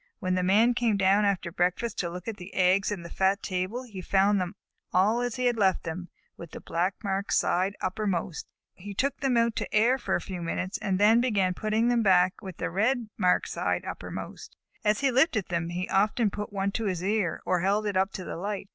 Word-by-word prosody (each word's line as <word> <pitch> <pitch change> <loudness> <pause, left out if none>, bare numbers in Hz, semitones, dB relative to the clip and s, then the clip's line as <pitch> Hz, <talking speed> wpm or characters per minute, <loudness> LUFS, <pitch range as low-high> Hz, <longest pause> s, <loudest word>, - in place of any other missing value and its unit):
When 185 -3 -1
the 185 - +1
Man 210 +7 +4
came 235 -3 +1
down 195 +2 +3
after 190 -3 0
breakfast 180 +7 -1
to 175 - -1
look 180 +3 -8
at 220 -2 -4
the 180 +2 -11
eggs 190 +2 +3
in 195 -4 -4
the 170 - -8
fat 195 +2 +1
table 185 +6 -2
he 210 -7 -8
found 195 +1 +2
them 180 +2 -4 0.4
all 205 +6 +3
as 245 -1 -2
he 250 -1 -2
had 240 -1 +2
left 190 -3 +2
them, 175 +2 -6 0.3
with 170 - -9
the - - -9
black 180 +4 -1
marked 195 0 -2
side 190 +3 +1
uppermost. 185 -3 -2 0.3
He 200 +2 -9
took 275 +6 0
them 265 -3 +1
out 230 -1 +2
to - - -3
air 235 +5 +3
for - - -1
a - - +1
few 185 -3 -6
minutes, 185 +3 -3
and 190 -2 -1
then 220 +3 +5
began 200 -7 +1
putting 215 +4 0
them 240 -1 +2
back 185 -2 +3
with 190 -4 -8
the - - -3
red 225 +5 0
marked 180 -3 +2
side - - -1
uppermost. - - -7 0.3
As 210 +3 +2
he 275 -1 +3
lifted 255 - +2
them, 170 -1 -1
he 180 +2 -3
often 210 +3 +2
put 210 +1 -5
one 200 0 -1
to 225 - -3
his 180 -3 -2
ear, 200 -3 0
or 180 -1 +1
held 200 +4 +1
it 205 -2 -2
up 190 +1 +2
to 185 - -5
the - - -6
light. 200 +1 -4
195 Hz, 225 wpm, -27 LUFS, 185-220 Hz, 0.4 s, then